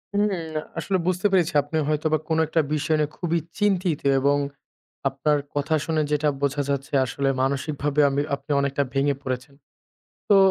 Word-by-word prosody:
হুম 205 +1 +3 0.5
আসলে 190 +4 0
বুঝতে 185 +2 +2
পেরেছি 180 -4 +2
আপনি 145 +3 -3
হয়তোবা 155 +1 +1
কোনো 160 0 +2
একটা 160 +1 +2
বিষয় 155 +1 +1
নিয়ে 150 -1 +1
খুবই 170 -1 0 0.2
চিন্তিত। 185 -6 +1 0.2
এবং, 140 +2 +3 0.7
আপনার 140 +2 +1 0.2
কথা 145 +2 0
শুনে 160 -1 0
যেটা 150 0 +2
বোঝা 140 +1 +1
যাচ্ছে 140 -1 -2
আসলে 135 +2 -1
মানসিকভাবে 140 +2 0
আমি 140 +1 0
আপনি 140 - -10
অনেকটা 140 0 0
ভেঙে 140 +1 +2
পড়েছেন। 130 +1 -4 0.7
তো, 205 - +6
150 Hz, 155 wpm, -24 LUFS, 140-160 Hz, 0.7 s, তো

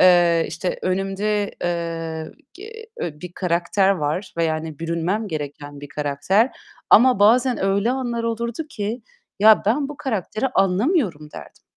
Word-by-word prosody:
Eee, 175 -2 +5
işte 165 +3 -3
önümde, 195 +2 -1
eee, 165 -2 -3 0.2
ge 390 - -11 0.4
e 150 -3 -5
bir 180 -1 -8
karakter 180 +2 +1
var 180 +1 -2
ve 170 - +1
yani 155 -1 -3
bürünmem 170 +6 -2
gereken 145 -2 -6
bir 145 - -9
karakter. 150 - +1 0.4
Ama 250 -1 +6
bazen 240 +2 +4
öyle 200 +4 +1
anlar 245 -3 -2
olurdu 235 +5 -3
ki; 225 -3 -4 0.4
"Ya, 215 +2 +6
ben 275 +6 +1
bu 295 - -8
karakteri 260 - -2
anlamıyorum." 195 - +1
derdim. - - -12
190 Hz, 140 wpm, -22 LUFS, 165-225 Hz, 0.4 s, Ama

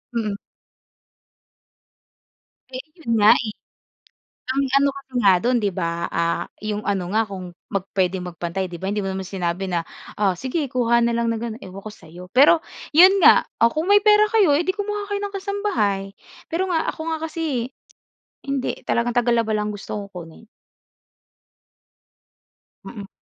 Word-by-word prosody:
Mm. 215 -3 -1 2.4
Eh, 255 - -5 0.2
'yon 230 -7 -1
nga, 210 +1 +7
eh. 215 -2 -4 1.0
Ang 275 +1 +1 0.2
ano 280 - +3
kasi 275 -1 -13
nga 195 -2 +6
do'n 245 +6 +1
'di 205 - +1
ba, 170 -1 -3
ah, 170 0 0 0.2
yung 210 0 -2
ano 195 -3 -1
nga 220 - +3
kung 185 -3 -7 0.2
mag 195 -1 -2
puwedeng 185 -1 0
magpantay 175 +2 -4
'di 175 - -9
ba, 190 - -2
hindi 205 +1 -1
mo 195 - -3
naman 190 - -4
sinabi 185 0 -3
na, 170 -2 -1 0.3
"O, 195 -3 +3
sige 265 - -2
kuha 235 -2 +2
na 235 - +1
lang 235 0 0
ng 225 - -2
ganun, 230 +1 -6
ewan 190 +1 -9
ko 215 - -6
sa'yo." 175 +1 -13
Pero 290 +5 +7 0.3
'yon 370 +5 +7
nga, - - +7 0.2
o 230 - +6
kung 315 +3 -2
may 410 0 +6
pera 425 0 +6
kayo, 405 -8 +5
eh 335 - -1
di 375 - 0
kumuha 415 0 -3
kayo 405 - -2
ng 405 -1 -5
kasambahay. 380 - -1 0.5
Pero 345 +3 -1
nga, 330 -3 0
ako - - -10
nga - - -2
kasi 295 -7 -2 0.7
hindi, 275 -2 -2
talagang 235 0 0
tagalaba 235 -2 +2
lang 210 0 -1
gusto 205 0 -7
kong 200 -1 -6
kunin. 170 +3 -11 2.4
Mm. 205 -4 -8
230 Hz, 165 wpm, -22 LUFS, 195-295 Hz, 2.4 s, nga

